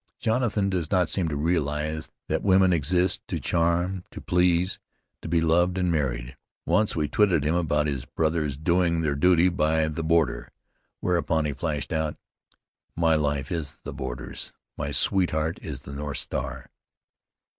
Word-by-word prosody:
Jonathan 110 -3 +1
does 90 -5 -1
not 90 -3 +2
seem 90 -4 +1
to 75 - -2
realize 75 0 -1 0.2
that - - 0
women 95 -2 +4
exist 90 +3 +1
to - - -3
charm, 85 +2 0
to - - -9
please, 90 +1 +2 0.4
to - - -7
be 85 +1 +2
loved 85 +3 +2
and 90 -2 +1
married. 65 -6 -2 0.3
Once 105 -1 +2
we 75 -2 0
twitted 90 -2 +3
him 75 +2 +1
about 75 -4 +1
his 70 -4 -2
brothers 80 -3 -1
doing 85 +1 +2
their 75 -3 +1
duty 90 +4 +4
by 80 -2 +1
the 80 +1 -3
border, 80 -1 +1 0.5
whereupon 85 -3 +1
he 75 - -1
flashed 75 +1 -3
out: 80 -1 -1 0.8
'My 80 -1 +3
life 70 -3 0
is 80 -4 -4
the - - -6
border's: 60 +1 -6 0.2
my 70 0 -3
sweetheart 80 0 +1
is - - -6
the 70 - -9
North 70 0 -4
Star!'" - - -5
80 Hz, 155 wpm, -26 LUFS, 75-90 Hz, 0.8 s, women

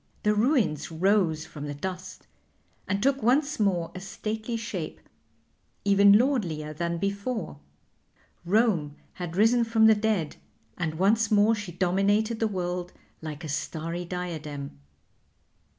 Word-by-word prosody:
The 210 - +3
ruins 210 - +1
rose 165 -2 +2
from 150 -3 -8
the 145 - -5
dust 185 +3 -6 0.6
and 195 +1 -1
took 275 0 +2
once 275 +5 +2
more 180 -5 +1
a 185 - -6
stately 215 +4 -4
shape, 230 0 -5 0.9
even 200 0 +6
lordlier 180 - 0
than 170 +2 -2
before. 200 - -3 0.8
Rome 175 -6 +1 0.3
had 175 -1 -4
risen 225 +4 +4
from 225 -1 +3
the 220 - +8
dead, 210 -7 -1 0.4
and 160 -3 -3
once 210 +5 +2
more 210 +1 +4
she 205 -4 -5
dominated 200 +5 +1
the 225 - +2
world 180 -2 -3 0.3
like 155 0 -7
a - - -5
starry 160 +4 -3
diadem. 155 - -6
190 Hz, 130 wpm, -27 LUFS, 165-220 Hz, 0.9 s, the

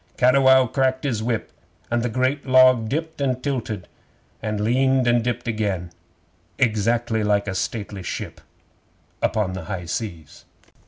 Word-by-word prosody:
'Cattiwow 130 +1 +5
cracked 130 +1 0
his 120 -7 -1
whip, 115 -1 -2 0.4
and 120 0 +1
the 120 - -1
great 130 +4 -1
log 130 -3 +5
dipped 160 +2 -3
and 130 -2 -1
tilted, 115 -9 -3 0.5
and 110 -1 -2
leaned 130 +4 +2
and 120 -1 +3
dipped 120 0 -3
again, 100 -6 -2 0.7
exactly 115 0 +1
like 105 0 +1
a 95 - -2
stately 100 0 -4
ship 90 - -6 0.8
upon 105 -4 0
the 95 -3 -6
high 90 -1 -5
seas. 85 -3 -6
115 Hz, 140 wpm, -23 LUFS, 105-130 Hz, 0.8 s, Cattiwow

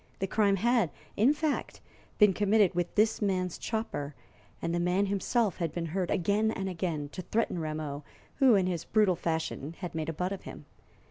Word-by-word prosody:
The 195 - -1
crime 200 0 +2
had, 230 -2 +2 0.3
in 230 +7 +5
fact, 300 0 -2 0.4
been 210 -3 +6
committed 205 0 +3
with 175 0 -2
this 220 +2 +3
man's 185 -3 -1
chopper, 185 - -3 0.4
and 170 0 -2
the 175 - +1
man 180 +3 +2
himself 200 +1 0
had 170 -4 -2
been 170 +1 -3
heard, 180 +2 -2
again 205 +5 +2
and 195 -3 -3
again, 165 -5 -3
to 185 - -6
threaten 210 -1 -1
Rameau, 155 -2 -4 0.3
who, 265 -5 +6
in 190 -2 +3
his 175 -3 -2
brutal 210 -4 +3
fashion, 160 -2 -3
had 180 -3 -6
made 160 -1 -3
a - - -2
butt 180 +4 -2
of 195 - -4
him. - - -10
185 Hz, 190 wpm, -30 LUFS, 165-210 Hz, 0.4 s, been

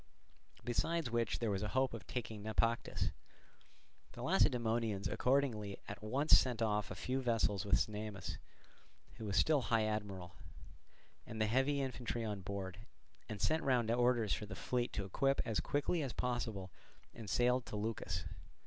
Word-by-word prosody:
Besides 150 +3 0
which 115 0 +1
there 115 -3 0
was 95 -1 -1
a 105 - -1
hope 130 -2 +3
of 115 - -7
taking 110 -4 -4
Naupactus. 115 +2 0 1.0
The - - -7
Lacedaemonians 115 -4 +2
accordingly 120 -7 +1
at 105 - -6
once 135 +8 +4
sent 125 -4 -1
off 105 -2 +1
a 95 - -5
few 125 +9 -1
vessels 110 -5 +1
with 100 -1 +4
Cnemus, 105 -2 -3 0.8
who 110 - -6
was 100 -1 0
still 155 -3 +4
high 115 -2 +2
admiral, 100 -5 -3 0.9
and 110 - -6
the 110 - +3
heavy 135 +5 +2
infantry 120 -3 -3
on 105 -2 -3
board; 95 -1 -5 0.5
and 105 -2 -4
sent 160 +9 +2
round 120 -4 +2
orders 120 -2 +3
for 105 - -3
the 100 - -6
fleet 125 +3 -1
to 100 - -2
equip 135 +8 +1
as 110 -2 0
quickly 145 +4 0
as 135 -5 -3
possible 110 -6 -2 0.4
and 110 -4 -8
sail 125 +4 +3
to 120 - -8
Leucas. 105 -4 -2
115 Hz, 155 wpm, -36 LUFS, 105-125 Hz, 1.0 s, once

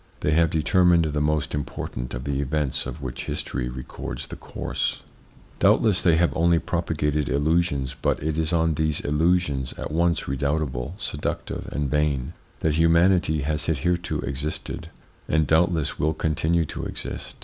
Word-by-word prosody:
They 75 - +1
have 80 +1 +4
determined 85 +2 +4
the 75 -1 -1
most 75 -1 0
important 65 -4 -4
of 60 - -5
the 70 0 -1
events 70 -1 -1
of 75 - -7
which 65 -2 -5
history - - -3
records 65 +1 -6
the - - -8
course. - - -3 0.6
Doubtless 105 -5 +4
they 85 -3 +4
have 85 +1 +2
only 85 +1 +4
propagated 75 -4 -1
illusions, 75 -2 +1
but - - +1
it 80 +1 -1
is 80 0 0
on 80 -1 +2
these 80 -1 0
illusions, 75 -3 +1
at - - -5
once 85 +2 +1
redoubtable, 70 +1 -1
seductive, 75 -8 -4
and 75 -1 -1
vain, 75 0 0 0.3
that 80 - +2
humanity 85 0 +4
has 75 +1 -1
hitherto 85 +3 0
existed, 70 +3 -4 0.4
and 80 0 +2
doubtless 80 0 +2
will 80 +1 +1
continue 80 +2 +1
to - - -6
exist. - - -6
75 Hz, 150 wpm, -25 LUFS, 70-85 Hz, 0.6 s, have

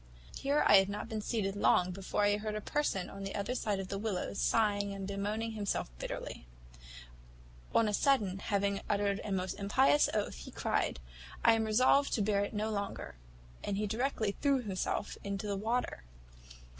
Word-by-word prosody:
Here 285 +2 +1
I 205 - +8
had 195 0 +4
not 205 +2 -4
been 220 -2 -3
seated 205 -3 -1
long 185 -2 +3
before 195 +2 -2
I 205 0 +3
heard 215 0 -4
a - - -1
person 210 -6 -1
on 195 - -8
the 195 - -4
other 200 +4 -2
side 210 -5 -1
of 190 -1 -5
the 195 - -3
willows 200 -2 -2
sighing 205 -2 +2
and 195 -1 -5
bemoaning 210 +3 -2
himself 205 - -2
bitterly. - - -6 1.3
On 225 - +5
a 210 - 0
sudden, 205 -7 +2
having 200 0 0
uttered 200 -1 +1
a 210 - -4
most 185 -1 -1
impious 265 +8 +4
oath, 210 - -1
he - - -9
cried, - - -1 0.5
`I 230 - +8
am 225 0 +1
resolved 255 +6 +4
to 215 - +2
bear 200 -1 +2
it 205 - -3
no 215 +1 -1
longer,' 200 -1 -4 0.5
and 200 - -2
directly 225 -1 0
threw 280 -1 +4
himself 200 0 -2
into 200 +1 -3
the 205 -1 -1
water. 225 - -1
205 Hz, 180 wpm, -33 LUFS, 195-220 Hz, 1.3 s, I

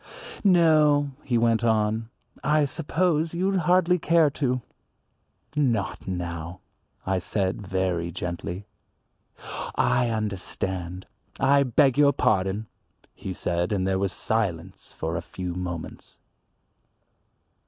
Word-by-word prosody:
"No," 155 -6 +4
he 125 -3 +1
went 115 0 +2
on, 110 0 +1 0.3
"I 150 0 +3
suppose 165 +2 0
you'd 190 +2 +1
hardly 180 0 +4
care 160 -2 +4
to." 125 -3 -1 0.9
"Not 130 -11 0
now," 85 -1 -4 0.4
I 95 0 +1
said 95 +2 -1
very 90 -3 -1
gently. 90 +2 -5 1.1
"I 125 -1 +2
understand. 95 -4 -3 0.3
I 140 +1 +4
beg 135 +1 +3
your 145 -1 +6
pardon," 95 -1 +1 0.5
he 95 - -6
said, 85 0 -1
and 95 -3 0
there 95 0 +1
was 100 -1 0
silence 95 -6 -2
for 80 +1 -4
a 85 - -2
few 90 +1 -6
moments. 85 -2 -6
110 Hz, 110 wpm, -25 LUFS, 90-145 Hz, 1.1 s, your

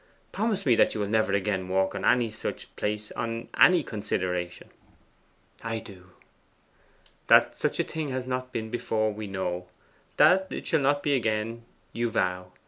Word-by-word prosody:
'Promise 210 -3 -1
me 125 - +5
that - - +3
you - - -2
will 105 - -1
never 110 -1 +1
again 100 -1 0
walk 95 +1 +1
on - - -5
any 120 -3 +3
such 110 - -6
place 105 0 -3
on 115 0 -4
any 175 -3 +7
consideration.' 90 -5 -3 0.9
'I 115 0 -2
do.' 95 -4 -11 1.2
'That - - +6
such - - -2
a - - +3
thing 160 -1 -4
has 130 -1 -3
not 130 0 -3
been 110 -3 -4
before, 110 -2 0
we 105 0 -6
know. 90 -2 -3 0.5
That 190 +1 +5
it - - -6
shall 160 - +2
not 145 +1 +2
be 145 - +2
again, 115 -1 -1 0.3
you 120 0 -1
vow. 90 -4 -1
110 Hz, 165 wpm, -27 LUFS, 95-125 Hz, 1.2 s, any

